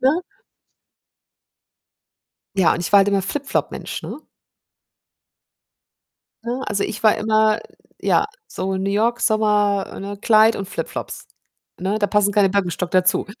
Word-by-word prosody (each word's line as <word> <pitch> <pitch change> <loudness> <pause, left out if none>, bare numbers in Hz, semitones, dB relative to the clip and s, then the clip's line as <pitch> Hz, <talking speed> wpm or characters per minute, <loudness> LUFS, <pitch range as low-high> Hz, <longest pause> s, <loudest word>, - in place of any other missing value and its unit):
ne? 285 +7 +2 2.3
Ja, 185 -4 +4
und - - -4
ich 170 - -4
war 200 - +8
halt 195 - +3
immer 200 -1 +2
Flip-Flop-Mensch, 270 +8 -3
ne? - - -6 2.3
Ne, 240 +3 -3
also 200 -1 -1
ich 220 - -5
war 215 - +5
immer, 215 0 +2 0.4
ja, - - +2 0.2
so 190 0 -3
New 190 +1 -2
York, 230 +4 +1
Sommer, 210 -2 +1
ne, 200 +1 -6
Kleid 220 +1 +4
und 195 - -4
Flipflops. - - -6 0.5
Ne, 195 +4 -1
da 205 - +1
passen 205 -1 +2
keine 200 -2 +3
Birkenstock 180 -2 -1
dazu. 185 +1 +2
205 Hz, 130 wpm, -21 LUFS, 195-220 Hz, 2.3 s, war